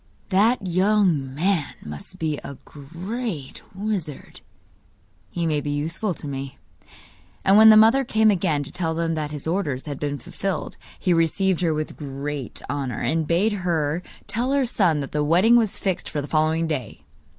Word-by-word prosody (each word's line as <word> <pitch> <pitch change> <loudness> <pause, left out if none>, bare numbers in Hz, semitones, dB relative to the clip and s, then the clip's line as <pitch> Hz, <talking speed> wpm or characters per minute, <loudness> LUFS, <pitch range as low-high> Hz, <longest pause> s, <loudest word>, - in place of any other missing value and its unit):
'That 205 +3 +3
young 185 -6 +2
man 170 -1 0
must 75 - -8
be 155 -4 -2
a 140 - -9
great 170 - -6
wizard; 190 -8 -4 0.9
he 170 -1 -2
may 150 -2 +1
be 145 - -4
useful 165 +7 -2
to 150 - -7
me.' 135 -1 -5 0.9
And 195 - +6
when 220 +1 +9
the 215 - +9
mother 225 +5 +6
came 220 -3 +3
again 165 -7 0
to - - -9
tell 165 -2 -2
him 165 -1 0
that 155 -2 -2
his 150 -2 -6
orders 160 -6 -1
had 145 -3 -5
been 145 -1 -2
fulfilled 190 +8 -4 0.2
he 180 - +2
received 170 +2 +1
her 170 -2 +2
with 155 0 -4
great 140 -1 -5
honour, 135 -4 -3
and 155 +5 0
bade 195 +6 +2
her 170 -4 -1 0.2
tell 245 +4 -1
her 280 -2 +2
son 180 -10 +2
that 135 - -6
the 150 0 0
wedding 180 +10 +5
was 225 -4 +2
fixed 190 -3 -2
for 150 - -3
the 145 - -4
following 160 +1 +1
day. 145 -9 -4
165 Hz, 175 wpm, -23 LUFS, 145-195 Hz, 0.9 s, when